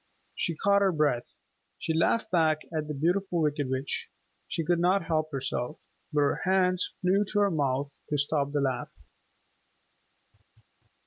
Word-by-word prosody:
She 170 - -1
caught 200 +4 +3
her 195 -1 +4
breath. 150 -7 0 0.4
She 160 - -2
laughed 215 +7 +1
back 160 -3 +2
at 155 -1 -2
the 150 - -3
Beautiful 175 +4 0
Wicked 145 -3 0
Witch. 130 +1 -3 0.4
She 165 - -2
could 175 0 +2
not 185 +2 +3
help 155 -1 -1
herself. 135 0 -3 0.3
But 150 -1 +2
her 140 - +2
hands 185 -1 +2
flew 190 +3 +3
to 205 +1 -1
her 200 -1 +3
mouth 140 -2 -1
to 150 - 0
stop 140 0 0
the 145 -1 0
laugh. 130 -3 -1
155 Hz, 150 wpm, -28 LUFS, 145-180 Hz, 0.4 s, her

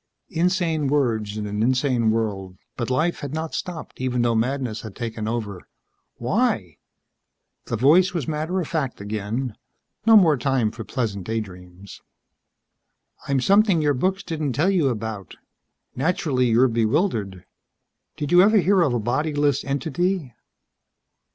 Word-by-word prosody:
Insane 165 -3 0
words 115 -7 0
in 105 - -3
an 105 +1 -3
insane 125 -1 +2
world. 100 -5 -2 0.2
But 120 -1 -3
life 155 +7 0
had 145 +1 -5
not 160 0 -4
stopped 170 -7 -6
even 125 -2 0
though 120 -1 +2
madness 120 0 -1
had 110 -3 -9
taken 115 -2 -4
over. 110 -5 -3 0.5
"Why?" - - -1 0.9
The 115 - -3
voice 160 - +5
was 165 -8 -3
matter 160 +4 -2
of 170 - -3
fact 145 -6 -2
again. 105 +4 -4 0.5
No 225 -1 +9
more 165 -7 +5
time 130 -5 0
for 110 - -8
pleasant 110 -8 -3
daydreams. 95 -4 -7 1.3
"I'm 140 -1 +1
something 200 - +4
your 150 -2 +2
books 185 +9 -1
didn't 155 -5 -3
tell 160 +10 +2
you 175 -7 +2
about. 110 -6 -4 0.6
Naturally 135 -4 0
you're 120 +3 +4
bewildered. 115 - 0 0.7
Did 145 - -3
you 175 0 +7
ever 215 +3 +5
hear 195 0 +3
of 140 -8 +2
a - - 0
bodyless 145 +4 0
entity?" 160 +1 -2
130 Hz, 140 wpm, -23 LUFS, 110-160 Hz, 1.3 s, No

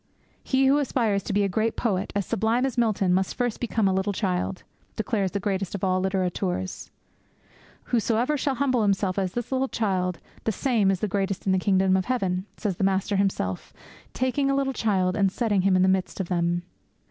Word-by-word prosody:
'He 265 0 +2
who 275 +2 +4
aspires 230 -8 +1
to 200 - -5
be 205 +1 +2
a - - +2
great 220 +4 0
poet 200 -4 -1
as 200 -2 0
sublime 230 +2 +1
as 265 - -2
Milton 215 -6 +2
must 190 +1 0
first 245 -3 -1
become 225 -3 0
a 190 - +2
little 190 +2 0
child!' 185 -2 -2 0.3
declares 210 -3 0
the 200 - -3
greatest 195 -1 -2
of 200 - -6
all 185 -1 +2
littérateurs. 185 -1 -2 0.9
'Whosoever 240 +4 +1
shall 275 -1 -1
humble 255 -2 +1
himself 195 -2 +1
as 190 -1 -2
this 240 +1 -4
little 265 0 +1
child, 185 -7 -1 0.3
the 225 - +2
same 220 -3 +1
is 190 -1 0
greatest 195 -1 -2
in 190 - +2
the 190 - +3
kingdom 190 -1 +3
of 190 -1 +1
heaven!' 190 -6 -1
says 195 -5 -2
the - - -1
Master 195 +1 +1
Himself, 190 - -1 0.4
taking 265 +2 0
a 275 - +2
little 275 -1 0
child 190 -6 +1
and 200 -3 +2
setting 210 -3 +1
him 190 0 +3
in 185 - +4
the - - +4
midst 190 0 0
of 185 - -3
them. 175 -1 0
200 Hz, 200 wpm, -25 LUFS, 185-230 Hz, 0.9 s, who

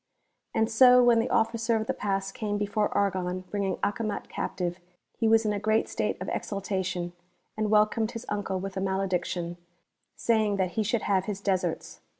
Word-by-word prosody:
yVxD 220 - +3
so 250 +2 +7
when 240 -1 +5
the 225 - 0
Officer 230 0 +1
of 220 0 0
the - - -1
Pass 195 -1 -2
came 205 0 -2
before 205 +1 0
Argon 185 -2 0
bringing 195 -3 -1
Acomat 210 +1 -2
captive, 175 0 -3 0.4
he 225 - +2
was 225 0 +4
in 210 - +1
a 205 - -2
great 215 +2 +1
state - - -2
of - - -5
exulta 195 -1 -2
tion, 175 -1 -3 0.4
and 215 -1 -1
welcomed 215 +1 +3
his 230 +1 -6
uncle 200 -2 -2
with 195 +1 -5
a 190 - -2
malediction,* 180 -3 -1 0.6
saying 220 -3 +2
that 190 -2 0
he 220 - -1
should 220 +2 0
have 190 -2 +1
his 205 -2 -4
deserts. 185 -4 -2
205 Hz, 180 wpm, -28 LUFS, 190-220 Hz, 0.6 s, so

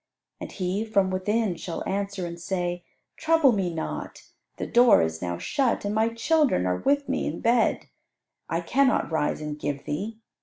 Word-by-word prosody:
And - - -7
he 190 +2 -2
from 200 -4 +1
within 205 +1 0
shall 165 +1 -5
answer 200 -1 -2
and 170 0 -7
say, 175 -1 -2 0.3
Trouble 320 -4 +4
me 190 -5 0
not, 160 -1 -5 0.3
the - - -3
door 240 - +5
is 80 0 -3
now 85 -1 -3
shut, 265 - 0
and 205 - -1
my 220 +1 +2
children 230 - +2
are 90 0 0
with 285 0 +1
me 270 - -1
in - - -4
bed; 235 0 +2 0.6
I - - -1
cannot 275 -9 +2
rise 155 -1 0
and 150 0 -5
give 145 -1 -4
thee. 210 +9 -4
200 Hz, 175 wpm, -26 LUFS, 170-235 Hz, 0.6 s, door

